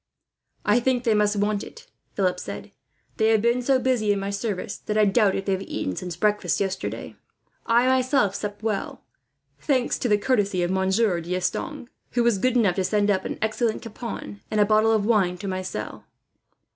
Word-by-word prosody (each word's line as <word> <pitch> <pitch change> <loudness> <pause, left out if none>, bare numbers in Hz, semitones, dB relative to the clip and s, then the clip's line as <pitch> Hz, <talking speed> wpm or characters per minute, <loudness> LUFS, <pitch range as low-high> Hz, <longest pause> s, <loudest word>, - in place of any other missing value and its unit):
"I 210 +4 +4
think 250 0 0
they 230 - +3
must 210 0 +2
want 205 0 0
it," - - -12 0.3
Philip 185 -2 +1
said. - - -7 0.5
"They 220 - +3
have 220 -1 +4
been 235 +1 +2
so 265 +2 +3
busy, 250 -5 +1
in 200 - +1
my 195 +1 -3
service, 200 -1 -3
that 210 - -3
I 215 - +5
doubt 200 -1 +3
if 195 - -3
they 195 - 0
have 190 0 0
eaten 95 - -4
since 180 - -5
breakfast 210 +4 +1
yesterday. 195 -1 -3 0.5
I 235 +1 +4
myself 255 -5 +2
supped 205 +1 -5
well, 215 -3 -3 0.6
thanks 260 -4 0
to 245 - -1
the 210 - +4
courtesy 205 -5 +1
of 175 - -1
Monsieur 190 0 +1
D'Estanges, 185 - -3 0.3
who 240 - +2
was 235 -4 +2
good 255 +4 +2
enough 200 -6 +2
to 190 - +1
send 205 +2 +2
up 190 - 0
an - - -4
excellent 220 +1 -1
capon, 225 -2 -7
and 215 - 0
a 205 - +6
bottle 215 +1 +3
of 215 -2 +2
wine 195 -6 +2
to 200 - -6
my 185 -1 -2
cell." 185 - -6
210 Hz, 195 wpm, -24 LUFS, 195-235 Hz, 0.6 s, a